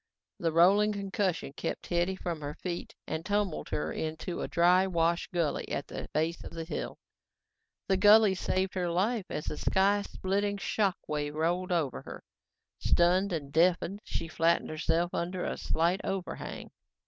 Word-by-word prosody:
The 165 -1 +1
rolling 195 +6 +5
concussion 195 -7 -2
swept - - -3
Hetty 175 +2 0
from 170 -4 -4
her 145 +1 -5
feet 175 -2 -5
and 160 - -3
tumbled 205 -3 -1
her 75 +1 -2
into 160 +2 -4
a - - -2
drywash 170 -1 +3
gully 170 -5 -1
at - - -2
the - - -7
base 160 +3 -1
of - - -9
the 165 -1 -4
hill. 165 - -5 0.9
The 190 - +3
gully 210 +1 +7
saved 185 0 -1
her 180 -2 -1
life 200 +5 0
as 150 - -4
the 150 - -3
sky 200 +2 +3
splitting 200 +1 -1
shock 200 -1 0
wave 150 -1 -2
rolled 175 +4 0
over 160 -7 0
her. - - -9 0.6
Stunned 185 +3 +3
and 145 -5 -4
deafened, 180 +3 +2
she 165 - -4
flattened 165 +1 +1
herself 165 +2 0
under 180 +1 -2
a - - -2
slight 170 +4 0
overhang. 190 -2 -5
175 Hz, 160 wpm, -30 LUFS, 165-190 Hz, 0.9 s, gully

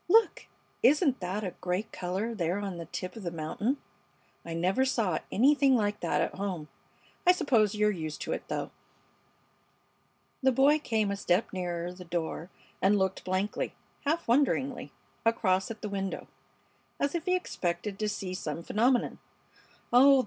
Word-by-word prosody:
"Look! 445 +6 +4 0.3
Isn't 290 -2 +4
that 190 +4 -3
a 185 -3 -3
great 185 +4 -1
color 190 +6 -2
there 175 -3 0
on 200 -3 -4
the 165 -1 -7
tip 185 +4 -5
of 225 - -7
the 180 - -2
mountain? 170 - -2 0.7
I 165 -1 -5
never 185 +9 +2
saw 220 -10 +1
anything 275 +3 +5
like 205 -3 +1
that - - +1
at - - -1
home. 185 -6 -4 0.6
I - - +10
suppose 225 - +2
you're 210 0 +3
used 155 -5 -4
to - - -3
it, - - -3
though." - - -3 1.7
The 265 0 +4
boy 275 +4 +5
came 220 -7 0
a - - 0
step 195 +1 +1
nearer 175 -1 -3
the 180 0 -10
door 170 0 -3 0.3
and 200 +2 +4
looked 190 -1 0
blankly, 185 +3 -1 0.3
half 320 +4 0
wonderingly, 265 +1 +1 0.3
across 190 -5 +2
at 225 -1 -7
the - - -1
window, 195 -1 -3 0.7
as 280 - +1
if 340 -1 -2
he 365 -1 +3
expected 195 - -2
to 215 -1 0
see 195 -2 -4
some 165 -2 -4
phenomenon. 240 +6 +2 0.7
"Oh! 270 +2 +8
205 Hz, 160 wpm, -30 LUFS, 180-255 Hz, 1.7 s, I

